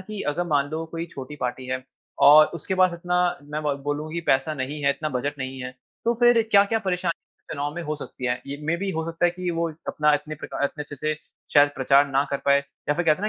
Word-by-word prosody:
कि 210 - -4
अगर 175 - -1
मान 140 0 +2
लो, 160 +1 -3
कोई 165 +1 -5
छोटी 135 +2 -7
पार्टी 125 +1 -3
है 130 0 -3 0.5
और 150 +1 +9
उसके 170 +3 -3
पास 185 0 +4
इतना 180 +1 0 0.3
मैं 150 +1 -2
ब 145 -2 0
बोलूँ 145 +2 -2
कि 170 - -2
पैसा 135 +4 0
नहीं 145 +2 -4
है, 140 - +5
इतना 155 +2 -2
बजट 140 +2 -3
नहीं 130 0 -5
है, 125 0 -6 0.3
तो 235 +1 +2
फिर 240 0 +5
क्या-क्या 200 +2 +5
परेशानी 180 -4 -2 0.3
चुनाव 145 0 -3
में 175 - -4
हो 155 -1 -2
सकती 130 -3 -8
है? 125 - +2
ये 140 - -5
मेबी 170 +5 0
हो 160 -3 -2
सकता 165 +1 -2
है 175 - +5
कि 180 0 -3
वो 170 0 0
इत 155 - -14
अपना 150 0 +2
इतने 150 +1 -3
प्रका 145 - -6
इतने 150 +1 -2
अच्छे 145 -1 -9
से 155 +3 -1 0.4
शायद 145 0 +7
प्रचार 135 +2 +4
ना 135 +1 +2
कर 140 - +1
पाए 140 0 +5
या 140 +1 -4
फिर 175 - -1
कहते 160 +4 +3
है 210 - +1
150 Hz, 250 wpm, -24 LUFS, 140-175 Hz, 0.5 s, और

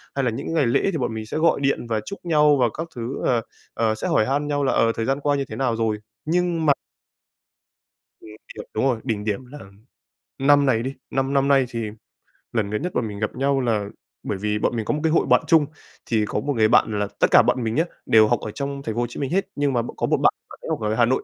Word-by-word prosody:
hay 135 - 0
là 120 - +1
những 130 +7 -4
ngày 155 -4 +2
lễ 115 - +2
thì 165 - -2
bọn 125 -4 -2
mình 110 -1 -5
sẽ 110 - -4
gọi 160 -1 +3
điện 140 -3 0
và 110 -2 0
chúc 200 - -7
nhau 150 -3 +4
và 125 - +3
các 165 +2 -3
thứ, 120 +2 -4
ờ, 120 -2 +2 0.3
ờ, 110 -1 +1
sẽ 110 - -4
hỏi 110 - +3
han 145 +4 -1
nhau 145 -1 0
là, 135 - +2
ờ, 115 - +3
thời 115 - -2
gian 135 +3 0
qua 145 0 +1
như 140 -1 -1
thế - - -8
nào 125 -4 0
rồi. 110 -1 0 0.3
Nhưng 170 0 0
mà 145 - +6 1.5
Mình 110 - -12 0.2
hiểu, - - -6
đúng 110 - 0
rồi, 125 -4 +1
đỉnh 110 -5 -2
điểm 105 +4 -2
là 145 +4 -11 0.8
năm 145 +1 +4
này 115 -4 +2
đi, 135 +2 -3 0.2
năm 135 +1 -1
năm 140 0 +2
nay 135 -2 +4
thì 115 -3 -4 0.6
lần 110 -4 0
gần 105 +1 -2
nhất 180 +3 -3
bọn 115 - -1
mình 100 -1 -7
gặp 105 - -2
nhau 135 +1 +1
là 110 -4 0 0.4
bởi 100 - -3
vì 105 +2 -1
bọn - - 0
mình 110 -2 -2
có - - 0
một 150 - -2
cái 160 - +2
hội 165 - +3
bạn - - +4
chung. 160 -3 +5 0.4
Thì 110 -3 +1
có 105 - -2
một 145 +6 -2
người 110 -2 +4
bạn 110 -2 +3
là 105 - 0
tất - - +5
cả - - +8
bọn 125 - +1
mình 110 0 -1
nhá, 160 - +3 0.2
đều 110 -1 +6
học 120 0 +1
ở 110 - -6
trong 140 +3 -4
Thành 110 -4 -4
phố 120 - 0
Hồ 120 - 0
Chí - - -8
Minh 140 0 -2
hết, 195 +2 0
nhưng 145 -1 0
mà 120 - +2
một 120 - -7
có - - 0
một - - +2
bạn, - - +3 0.2
bạn - - -13
ấy - - -7
học - - -1
ở 105 0 0
Hà 120 - +4
Nội. 130 +3 0
125 Hz, 280 wpm, -23 LUFS, 110-145 Hz, 1.5 s, cả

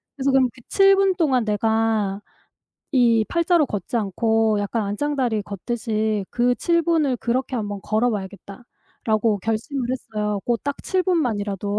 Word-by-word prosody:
그래서 275 -1 0
'그럼 260 -2 +3
그 255 - -17
7 390 0 +5
분 390 -1 +3
동안 265 -9 +1
내가 215 -1 0 0.7
이 235 -4 +4
8자로 335 -2 +2
걷지 205 +1 -4
않고 220 +1 +1
약간 210 +3 -2
안짱다리 240 +1 -1
걷듯이 215 0 -2
그 245 0 +2
7 335 +5 +2
분을 315 -6 +1
그렇게 255 +2 -1
한번 205 -2 -4
걸어 220 +3 +1
봐야겠다.'라고 210 +1 -3
결심을 225 +6 -2
했어요. 210 -5 -3
고 240 -1 +1
딱 285 +5 -5
7 375 -1 0
분만이라도. 210 - -1
225 Hz, 285 characters per minute, -22 LUFS, 210-265 Hz, 0.7 s, 7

